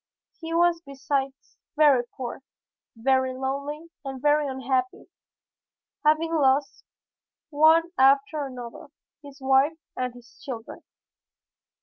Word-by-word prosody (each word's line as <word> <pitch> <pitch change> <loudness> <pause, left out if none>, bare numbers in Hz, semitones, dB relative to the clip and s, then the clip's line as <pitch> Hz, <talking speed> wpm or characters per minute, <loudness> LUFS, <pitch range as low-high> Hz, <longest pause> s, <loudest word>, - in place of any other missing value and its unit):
He 330 -1 -7
was 340 0 +2
besides 275 -1 -4 0.2
very 290 -5 +5 0.2
poor, 255 0 -6 0.5
very 260 +2 +1
lonely 280 +5 -4
and 270 -1 -6
very 295 +2 +2
unhappy, 260 -1 -2 0.9
having 310 +2 +2
lost 275 -2 +1 0.7
one 315 +3 +5 0.2
after 275 +3 +3
another, 245 0 -9 0.3
his 285 -1 -13
wife 270 +4 +3 0.2
and 255 -1 -2
his 240 -1 -17
children. 235 -4 -7
275 Hz, 100 wpm, -25 LUFS, 260-300 Hz, 0.9 s, very